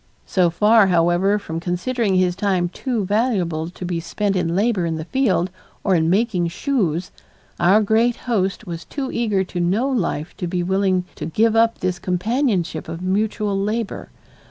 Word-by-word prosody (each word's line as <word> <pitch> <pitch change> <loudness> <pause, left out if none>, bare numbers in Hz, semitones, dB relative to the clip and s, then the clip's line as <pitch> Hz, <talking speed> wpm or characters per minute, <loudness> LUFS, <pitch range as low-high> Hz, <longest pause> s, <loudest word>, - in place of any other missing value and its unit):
So 180 -3 +2
far, 210 +4 +4
however, 175 +3 +3
from 165 -5 -5
considering 190 +5 -1
his 180 -1 +2
time 190 -3 0
too 230 +2 -2
valuable 185 -7 0
to 180 +1 -8
be 175 -1 -2
spent 200 +4 -2
in 170 -2 0
labor 205 -2 +1
in 165 - -2
the 160 0 -5
field 185 -7 +1 0.3
or 195 - +2
in 165 -2 +2
making 195 -2 +1
shoes, 180 - -1 0.5
our 190 +5 +5
great 225 +3 +2
host 210 -3 -1
was 170 -2 -6
too 275 -2 -5
eager 210 -5 0
to 180 -1 -6
know 190 +9 +1
life 180 - -2
to 180 - -3
be 175 +1 -1
willing 190 0 +1
to - - -6
give 220 +7 +2
up 230 0 +3
this 185 -1 -1
companionship 185 - -1
of 165 +2 -6
mutual 205 +1 0
labor. 210 +2 -2
190 Hz, 170 wpm, -21 LUFS, 175-220 Hz, 0.5 s, our